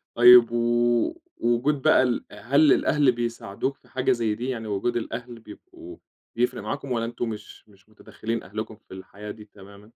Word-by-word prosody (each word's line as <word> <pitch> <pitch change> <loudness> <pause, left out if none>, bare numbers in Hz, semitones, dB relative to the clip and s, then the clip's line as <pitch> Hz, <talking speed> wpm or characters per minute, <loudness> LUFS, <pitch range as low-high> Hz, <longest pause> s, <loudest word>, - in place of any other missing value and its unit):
طيب 120 -1 +8
و 120 - +1 0.2
وجود 125 +5 0
بقى 130 - +5
ال 125 -2 -1
هل 135 +9 +2
للأهل 145 -2 +3
بيساعدوك 120 +1 -4
في - - -27
حاجة 130 - 0
زي 115 -3 0
دي، 125 +4 -4
يعني 115 -4 -4
وجود 105 +4 -1
الأهل 120 0 -6
بيبقوا 345 - -13 0.4
بيفرق 120 -1 0
معاكُم 135 +5 -5
والا 115 -1 0
أنتُم 120 0 -4
مش 105 0 -10
مش 100 +1 -24
متدخلين 110 +1 -6
أهلكُم 110 +3 -6
في 105 -3 -17
الحياة 100 +2 -9
دي 105 -1 -12
تمامًا؟ 100 +1 -16
120 Hz, 170 wpm, -25 LUFS, 105-125 Hz, 0.4 s, طيب